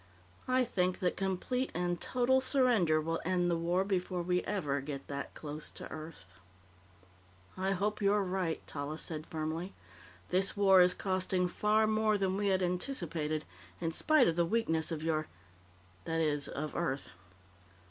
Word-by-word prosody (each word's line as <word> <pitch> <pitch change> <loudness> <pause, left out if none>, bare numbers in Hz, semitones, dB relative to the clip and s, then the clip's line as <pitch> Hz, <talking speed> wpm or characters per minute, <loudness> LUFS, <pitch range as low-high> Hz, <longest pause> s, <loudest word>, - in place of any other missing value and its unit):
I 255 0 +3
think 185 -6 0
that 180 - +1
complete 195 +7 -2
and 175 0 -1
total 255 +1 +2
surrender 240 - +3
will 165 +1 -2
end 175 0 +1
the - - +2
war 170 +3 +1
before 185 -2 -1
we 180 +1 +1
ever 145 -9 -1
get 140 -1 -6
that 140 0 -5
close 150 0 -6
to - - -8
Earth." 155 +1 -8 1.3
"I 190 +1 0
hope 210 +3 -1
you're 205 0 +3
right," 185 -3 -2
Tallis 150 +2 -3
said 155 -1 -4
firmly. 160 +4 -4 0.5
"This 190 +2 +3
war 195 -2 +6
is 180 0 +4
costing 185 -1 0
far 210 +4 +2
more 215 0 +2
than 190 -1 0
we 205 +1 0
had 190 -1 +2
anticipated, 170 - -1 0.3
in 165 - -1
spite 305 - +4
of 165 - +1
the 170 - +4
weakness 165 -5 +1
of 155 -1 -3
your 155 -1 0 0.8
that 165 0 -1
is, 145 -3 +1
of 150 +1 -5
Earth." 155 -5 -2
180 Hz, 155 wpm, -32 LUFS, 160-200 Hz, 1.3 s, war